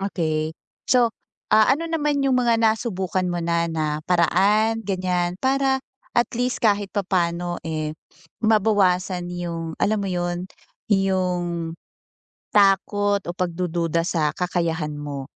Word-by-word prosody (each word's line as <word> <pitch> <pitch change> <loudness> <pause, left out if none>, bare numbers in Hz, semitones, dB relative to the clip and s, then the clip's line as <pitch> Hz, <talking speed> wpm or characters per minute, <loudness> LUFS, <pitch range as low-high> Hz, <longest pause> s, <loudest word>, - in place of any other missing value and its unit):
okey. 160 -5 -2 0.3
So, 240 -3 +4 0.4
ah, 215 +2 +6
ano 330 - -5
naman 295 -4 0
'yung 270 - +2
mga 235 -2 +3
nasubukan 215 -5 0
mo 175 - -2
na 170 0 +1
na 155 -2 -2
paraan 210 +6 +3
ganiyan 180 -3 -1
para 270 +2 +2 0.4
at 240 - +3
least 245 +1 -1
kahit 205 -2 +3
papaano, 175 -3 -1
eh, 155 -1 -3 0.5
mabawasan 190 -5 +2
'yung, 170 -2 -5
alam 215 +1 +1
mo 195 - -2
'yun, 175 0 -2 0.4
'yung, 180 -4 0 0.8
takot 205 0 +3
o 175 - -4
pagdududa 170 -2 -1
sa 160 -4 +1
kakayahan 170 -4 -1
mo? 145 -2 -5
185 Hz, 120 wpm, -23 LUFS, 170-215 Hz, 0.8 s, ah